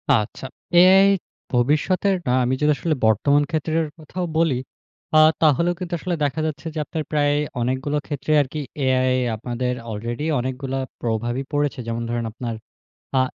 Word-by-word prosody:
আচ্ছা। 120 -1 +1 0.3
এআই 190 +2 +7 0.5
ভবিষ্যতের 155 +10 +2
না - - +2
আমি 125 +1 +1
যদি 150 0 +4
আসলে 155 +4 0
বর্তমান 140 +7 +3
ক্ষেত্রের 160 0 0
কথাও 170 +3 -5
বলি, 165 -5 +3 0.6
আ - - +8 0.2
তাহলেও 165 +3 +3
কিন্তু 180 -1 -5
আসলে 180 +2 -2
দেখা 145 +2 0
যাচ্ছে 155 +1 -6
যে - - -2
আপনার 155 +2 -4
প্রায় 145 -1 +2 0.3
অনেকগুলো 130 +4 -1
ক্ষেত্রে 145 0 -3
আরকি 145 +2 -4 0.3
এআই 130 0 +2 0.2
আপনাদের 125 +2 -2 0.2
আলরেডি 115 +6 -4
অনেকগুলা 130 +1 -3 0.2
প্রভাবই 120 +3 -1
পড়েছে। 145 -2 0
যেমন 115 0 -2
ধরেন 120 0 -2
আপনার 115 0 -5 0.6
আ - - +4
140 Hz, 150 wpm, -22 LUFS, 125-155 Hz, 0.6 s, আ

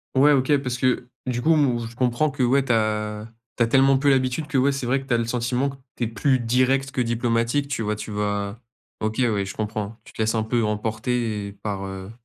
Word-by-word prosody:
Ouais, 145 +3 +6
OK, 140 +1 +3
parce 125 -3 -3
que 125 0 +1 0.2
du 125 -1 -2
coup 165 +5 +4
m 140 -6 +2
je 120 - -15
comprends 125 +4 +1
que 135 -1 -1
ouais, 135 +2 +3
tu 125 - +2
as 105 -1 -1 0.3
tu 120 - +4
as - - +1
tellement 135 +2 +5
peu 140 +2 +2
l'habitude 135 +3 +1
que 150 -2 -1
ouais 135 +2 +4
c'est 135 -2 -3
vrai 135 +3 +1
que - - -12
tu 125 - 0
as - - +4
le 115 - 0
sentiment 125 +3 0
que 140 - -8 0.2
tu - - -3
es - - +1
plus 130 +4 +1
direct 130 +3 +1
que 140 - -4
diplomatique 120 +3 0
tu 135 - -2
vois. 105 -1 -1
Tu 105 - -7
vas 105 0 -2 0.4
OK, 110 0 -2
ouais, 110 -6 +1
je 95 - -7
comprends. 110 0 -4
Tu - - -15
te - - -5
laisses 110 +1 +1
un 110 - +1
peu 115 +1 0
emporter 110 -1 -2
par, 100 -2 -3
heu, 95 +1 -7
120 Hz, 245 wpm, -23 LUFS, 110-135 Hz, 0.4 s, Ouais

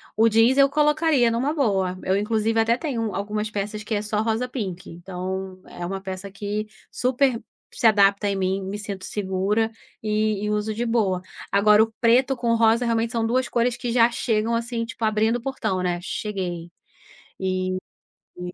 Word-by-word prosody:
O 225 +1 +5
jeans, 225 +4 +4
eu 275 0 +6
colocaria 300 -3 +3
numa 255 +6 0
boa, 195 - 0
eu 190 +1 +1
inclusive 220 +2 +1
até 225 +1 +3
tenho 265 -6 -3
um - - -6
algumas 210 +2 -2
peças 210 +1 -4
que 215 - -4
é 205 - 0
só 210 0 -1
rosa-pink, 220 -5 -3
então 185 +2 -6
é 175 - -7
uma 195 +2 -4
peça 190 0 -6
que 205 +2 -4 0.2
super 255 -1 +1 0.3
se 255 - -4
adapta 200 -1 +5
em 200 - -1
mim, 190 0 0
me 195 +2 -4
sinto 200 -2 -6
segura, 205 +3 0 0.3
e 215 -1 0
e - - -1
uso 210 +1 -1
de 235 +3 -2
boa. 210 -6 +1 0.3
Agora 210 +2 +5
o 225 - -4
preto 250 +3 +4
com 235 -2 0
rosa, 230 +1 +3
realmente 230 0 0
são 230 -2 0
2 255 +2 +1
cores 240 0 +1
que 240 - -3
já 235 0 +5
chegam 225 -1 0
assim, 230 0 -2
tipo, 230 - -8
abrindo 215 +1 +2
o - - -10
portão, 220 -7 -2
né, 175 -1 0
"cheguei". 180 -3 -4 0.7
E 185 0 -1 0.6
e 180 0 -6
215 Hz, 180 wpm, -24 LUFS, 195-235 Hz, 0.7 s, eu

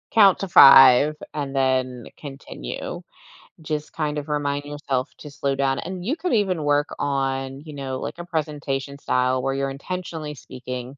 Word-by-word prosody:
Count 200 -4 +5
to 195 - -4
5 135 -1 +8 0.2
and 140 -2 -4
then 130 -2 0
continue. 135 - -7 0.6
Just 150 -1 -4
kind 150 -1 -2
of 145 0 -5
remind 145 -1 -2
yourself 145 -2 -3
to 150 - -10
slow 140 -1 -2
down, 135 0 0
and 185 -1 -6
you 280 +9 -1
could 355 +2 -2
even 190 -8 +1
work 145 +1 +1
on, 135 -1 -2
you 155 0 -11
know, 135 -2 -5
like - - -5
a 175 - -7
presentation 145 -4 -3
style 130 -1 +1
where 135 +1 -1
you're 135 0 -1
intentionally 160 +1 -6
speaking 125 0 -8
140 Hz, 165 wpm, -23 LUFS, 135-155 Hz, 0.6 s, 5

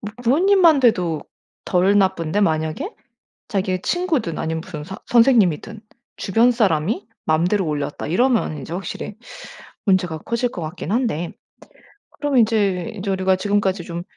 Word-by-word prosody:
뭐 210 0 -7
부모님만 330 +4 +4
돼도 180 - +2 0.4
덜 190 +2 +2
나쁜데 190 -2 +1
만약에 160 - -1 0.6
자기의 190 -2 -1
친구든 315 - -1
아니면 160 0 -2
무슨 150 -3 -8
서 190 +4 -8
선생님이든 225 - +3 0.4
주변 225 +5 +3
사람이 205 -1 0 0.2
마음대로 175 +5 +1
올렸다. 145 -1 -3
이러면 225 - +1
이제 160 - -8
확실히 185 +3 -5 0.7
문제가 180 -4 +1
커질 235 +7 -1
것 175 - -7
같긴 160 +3 -5
한데 220 - -1 0.9
그럼 290 -3 0
인제 210 -6 +1
인제 200 0 -3
우리가 190 0 +2
지금까지 195 -1 0
좀 170 0 -5
190 Hz, 320 characters per minute, -21 LUFS, 170-230 Hz, 0.9 s, 부모님만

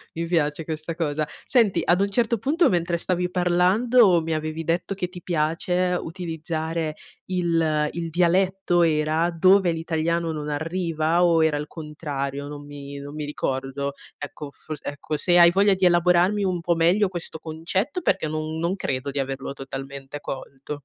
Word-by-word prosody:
Mi 165 - -2
piace 160 -2 0
questa 160 +1 -4
cosa. 155 -2 -1 0.2
Senti, 230 -7 +3
ad 180 +3 +3
un 200 - +1
certo 235 +2 +1
punto 320 - +3
mentre 175 -1 0
stavi 180 +1 -1
parlando 180 +4 +4
mi 160 0 -2
avevi 155 +1 -3
detto 170 +4 -1
che 180 -2 -3
ti 180 -1 -10
piace 180 +2 0
utilizzare 160 -2 -4 0.3
il 165 -4 +1
il 170 -1 -4
dialetto 180 +1 +2
era, 155 +1 +2
dove 185 +2 +4
l'italiano 165 0 -1
non 150 -1 -4
arriva, 165 +1 0
o 165 -2 +4
era 155 -2 +2
il 150 0 -4
contrario? 145 -3 -5
Non 145 0 -8
mi 140 -1 -9
non 140 +1 -8
mi 150 -1 -4
ricordo, 140 -1 -3 0.2
ecco 145 0 -7
fors 155 0 -8
ecco, 145 +1 -4
se 175 +2 +4
hai 170 0 +8
voglia 200 +2 +4
di 185 -1 +1
elaborarmi 180 +3 +4
un 180 -3 -1
po' 170 0 +1
meglio 175 +5 +3
questo 175 -3 -5
concetto, 185 - -2
perché 155 - +1
non 155 +1 -3
non 170 +3 0
credo 140 -7 -3
di 140 - -3
averlo 135 0 -3
totalmente 135 +1 -7
colto. 140 +1 -7
165 Hz, 165 wpm, -24 LUFS, 150-180 Hz, 0.3 s, hai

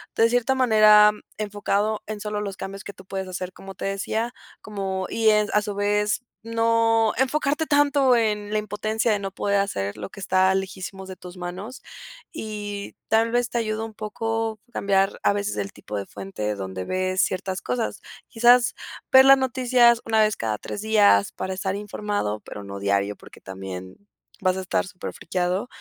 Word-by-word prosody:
de 225 0 +4
cierta 245 +2 +2
manera 215 -4 +7 0.3
enfocado 210 0 -1
en 215 -1 -5
solo 210 -1 -3
los 200 -2 -4
cambios 195 +1 -7
que 200 - -7
tú 190 - -15
puedes 190 0 -4
hacer, 185 0 -5
como 195 +1 -11
te - - -8
decía, 220 +4 -2 0.3
como 195 -3 -3
y 225 -1 0
es 210 0 +3
a 210 - +4
su 205 -1 -5
vez, 210 +3 +1 0.2
no 230 -1 +2
enfocarte 290 +4 +1
tanto 285 -3 +4
en 210 -3 0
la 215 - +2
impotencia 215 +2 -1
de 205 - +1
no 195 -1 -4
poder 200 +1 0
hacer 100 - -2
lo 100 -2 -6
que 200 - -11
está 190 0 +3
lejísimos 190 0 -5
de 185 - -8
tus 180 0 -11
manos. 185 +8 -7 0.5
Y 205 -2 -6
tal 225 +1 +3
vez, 245 0 +1
te - - -2
ayuda 215 -1 -2
un 225 - -9
poco 225 +1 -3
cambiar 195 -1 +1
a - - +4
veces 200 - -2
el 100 -1 -3
tipo 105 0 -7
de 100 - -4
fuente 105 +2 -4
donde 95 -1 -5
ves 185 0 -1
ciertas 190 0 -2
cosas. 125 -4 -3 0.3
Quizás 245 +1 +5 0.4
ver 265 0 +9
las 270 0 +8
noticias 245 -2 +3
una 220 -1 +3
vez 215 -1 +2
cada 110 -2 -2
3 - - -6
días 205 - +4
para 190 0 -4
estar 190 +1 -2
informado, 205 - -3
pero 105 - -9
no 100 0 -7
diario, 100 +1 0
porque - - -15
también 95 -1 -8 0.4
vas 185 -1 +2
a 190 - -2
estar 185 +1 -1
superfrikeado, 180 +2 -3
205 Hz, 180 wpm, -24 LUFS, 185-225 Hz, 0.5 s, ver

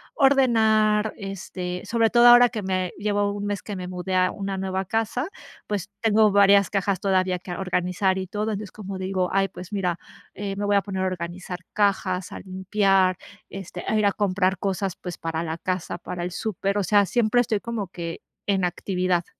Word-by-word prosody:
ordenar, 220 -6 +3
este, 185 -3 -5
sobre 230 -1 +2
todo 240 0 +6
ahora 245 0 +9
que 215 - -4
me 185 -1 -1
llevo 205 -1 +1
1 205 0 -4
mes 205 -1 -2
que 205 - -5
me 180 -1 -5
mudé 185 +1 -3
a 185 0 +3
una 195 -1 -4
nueva 190 0 -2
casa. 225 - -1 0.4
Pues, 200 -2 -3
tengo 215 -1 +4
varias 200 -1 +5
cajas 195 -2 0
todavía 185 -2 +1
que 180 - -9
organizar 180 +1 0
y 190 -1 -3
todo. 210 +3 -3
Entonces, 210 0 -3
es - - -13
como 195 -2 -7
digo: 185 -1 -1
"Ay, 195 0 +2
pues 185 +3 -10
mira, 180 -4 0 0.4
eh, 195 0 -4
me 205 - -2
voy 205 0 +3
a 200 - +3
poner 190 -2 -3
a - - +1
organizar 180 0 -5
cajas, 190 -3 0
a - - -7
limpiar, 190 -1 +1 0.3
este, 190 -2 -7
a 220 - +1
ir 210 - +2
a 200 - +3
comprar 190 -2 +1
cosas, 195 -1 -2
pues, 175 -2 -7
para 165 0 -3
la 160 0 -4
casa, 185 0 -3
para 175 0 -6
el 180 - -3
súper". 200 0 -2
O 205 - +1
sea, 205 +1 +4
siempre 240 +4 +2
estoy 220 -3 0
como 225 -3 -4
que 170 -2 -6 0.3
en 195 -2 +1
actividad. 180 0 -1
195 Hz, 200 wpm, -24 LUFS, 185-205 Hz, 0.4 s, ahora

